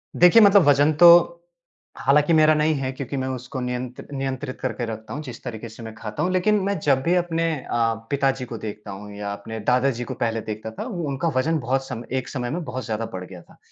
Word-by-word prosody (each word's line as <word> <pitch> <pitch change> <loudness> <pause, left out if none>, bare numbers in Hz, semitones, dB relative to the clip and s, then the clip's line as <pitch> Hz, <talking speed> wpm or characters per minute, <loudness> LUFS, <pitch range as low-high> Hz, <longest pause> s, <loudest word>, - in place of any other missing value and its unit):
देखिए, 180 +6 +7
मतलब 200 -2 +7
वज़न 145 +2 +5
तो 175 - +9 0.9
हालाँकि 150 +4 +3
मेरा 155 -1 +6
नहीं 155 +1 +2
है, 135 -2 -2
क्योंकि 135 +1 -5
मैं 130 - -2
उसको 130 +1 -5
नियंत्र 125 0 -5
नियंत्रित 135 -2 -4
करके 120 -2 -2
रखता 110 -1 -7
हूँ, 145 - -4
जिस 125 -4 -9
तरीके 115 -2 -6
से 110 +1 -11
मैं 110 -1 -8
खाता 110 -2 -4
हूँ। 180 - 0
लेकिन 210 +3 +2
मैं 200 0 -1
जब 140 -3 +2
भी 175 +4 +2
अपने 170 -2 0
अ, 115 -4 0 0.2
पिताजी 135 -2 0
को 120 -1 -7
देखता 105 -1 -7
हूँ 105 +1 -9
या 100 0 -4
अपने 110 +2 -7
दादाजी 125 -1 +1
को - - -5
पहले 115 -1 -2
देखता 110 +1 -6
था, - - -3
वो 180 -8 -4
उनका 140 +4 -2
वज़न 160 +5 +1
बहुत 135 +1 -1
सम 120 -2 -6
एक 130 -1 -2
समय 125 -3 -3
में 175 +3 -3
बहुत 130 -4 -5
ज़्यादा 115 0 -3
बढ़ 90 0 -5
गया 90 -1 -11
था। - - -21
130 Hz, 230 wpm, -23 LUFS, 115-150 Hz, 0.9 s, तो